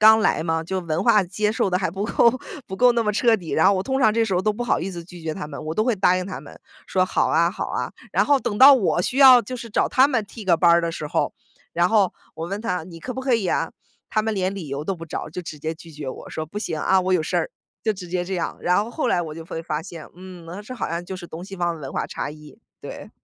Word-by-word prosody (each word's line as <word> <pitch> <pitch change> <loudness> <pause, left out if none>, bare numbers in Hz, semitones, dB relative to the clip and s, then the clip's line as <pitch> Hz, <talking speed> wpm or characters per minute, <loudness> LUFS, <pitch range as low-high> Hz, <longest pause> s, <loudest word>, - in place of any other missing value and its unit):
刚 220 +1 +8
来 185 - +2
嘛， 160 -1 -1
就 190 +2 -2
文 165 +2 -2
化 215 -4 +5
接 210 +4 -1
受 200 -3 0
得 180 - +2
还 190 - 0
不 195 +4 -3
够 235 - +4 0.4
不 190 - -6
够 250 +4 +6
那 235 - +1
么 210 - +1
彻 230 +1 +3
底， 175 -5 -7
然 160 - +3
后 200 - +6
我 185 - -1
通 265 0 -1
常 220 -4 +5
这 230 0 +2
时 195 -4 -1
候 180 - +1
都 215 - +2
不 240 +4 -4
好 240 - +1
意 185 - -3
思 170 -2 -7
拒 175 -1 -12
绝 160 -1 -2
他 150 - -6
们， 145 -2 -8
我 160 - -2
都 215 - +1
会 245 -3 +2
答 185 -2 +3
应 185 - -3
他 190 - -6
们， - - -13 0.3
说： 185 -1 +2
“好 - - +1
啊 170 +2 +3
好 200 - -4
啊”。 - - -3 0.2
然 - - +2
后 285 -2 +3
等 215 -5 -3
到 275 +2 +10
我 200 -7 +1
需 255 +8 -2
要 260 -3 +9
就 255 - -6
是 230 -2 -8
找 - - +2
他 270 0 +5
们 230 -6 0
替 210 +1 -10
个 175 -3 +4
班 170 +1 +4
儿 170 - +5
的 170 - -1
时 155 -2 -5
候， - - 0 0.4
然 175 +1 +2
后 205 -3 +3 0.2
我 165 +2 -5
问 200 +2 -3
他： 180 -7 -2
“你 165 -2 -11
可 255 +8 -6
不 260 - -4
可 260 -1 0
以 210 -5 0
啊？” 165 -1 0 0.4
他 215 - +1
们 220 -1 -1
连 190 -1 0
理 180 -6 -6
由 140 +1 -4
都 190 0 -2
不 165 0 -9
找， - - -5
就 180 - -5
直 155 -2 -7
接 160 +2 -3
拒 165 0 -14
绝 145 -2 -6
我， - - -8
说： 155 - -4
“不 205 - -4
行， 160 -7 -3
啊， 190 0 +3
我 185 0 0
有 175 -3 +3
事 - - -2
儿”， - - 0 0.3
就 220 - +2
直 185 -3 -9
接 180 0 -1
这 190 +1 -4
样。 170 - -3
然 180 +3 +2
后 230 - -8
后 305 - -2
来 175 - +2
我 155 -2 -6
就 165 0 -8
会 165 -1 -6
发 155 -1 -2
现， 165 -3 -10
嗯， 180 -2 -11
那 180 +5 -7
这 255 +4 -8
好 230 - -3
像 170 +1 -3
就 190 - -6
是 175 - -9
东 170 +3 -8
西 195 0 -9
方 175 -2 -1
文 135 -3 -7
化 - - -2
差 - - -4
异， 150 +6 -13 0.2
对。 - - -9
185 Hz, 330 characters per minute, -23 LUFS, 165-215 Hz, 0.4 s, 到